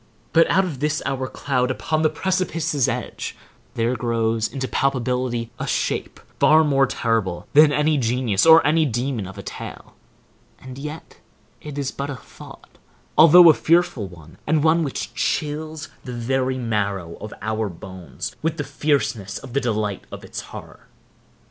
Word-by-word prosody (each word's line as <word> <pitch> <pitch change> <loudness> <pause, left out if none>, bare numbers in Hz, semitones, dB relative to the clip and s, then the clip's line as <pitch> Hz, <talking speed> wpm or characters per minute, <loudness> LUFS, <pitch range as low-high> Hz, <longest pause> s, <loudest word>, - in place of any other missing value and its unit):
But 165 - +5
out 190 +3 +4
of 155 -8 -5
this 150 +2 -1
our 135 -1 -2
cloud 125 -2 -1
upon 155 +4 -1
the 155 - +3
precipice's 165 -7 0
edge, - - -4 0.4
there 115 +2 0
grows 115 -2 0
into 130 -2 -4
palpability, 125 -3 -1
a - - -3
shape, - - -2 0.2
far 155 +1 +6
more 135 -3 +3
terrible 115 -8 -1
than 150 +1 +7
any 150 +1 +2
genius 120 -4 +1
or 160 0 +8
any 160 +2 +3
demon 120 -5 -2
of 95 +1 -10
a 100 - -7
tale, - - -8 0.6
and 130 +1 -10
yet 150 +2 -8 0.4
it 150 -2 -8
is 140 -2 -2
but 140 +1 -5
a 140 - -4
thought, 125 - -14 0.4
although 170 +2 +9
a - - +2
fearful 165 - +1
one, 80 -3 -15
and 155 -2 +2
one 165 +1 +4
which 140 - -4
chills 155 +1 -2
the 125 - -7
very 130 +2 -1
marrow 100 -7 -2
of 105 - -8
our 110 -1 -2
bones 90 0 -8
with 160 +1 -1
the 145 - -2
fierceness 135 -11 -1
of 130 -4 -10
the 140 - +1
delight 105 -5 -2
of - - -8
its - - -6
horror. - - -11
130 Hz, 160 wpm, -22 LUFS, 115-155 Hz, 0.6 s, although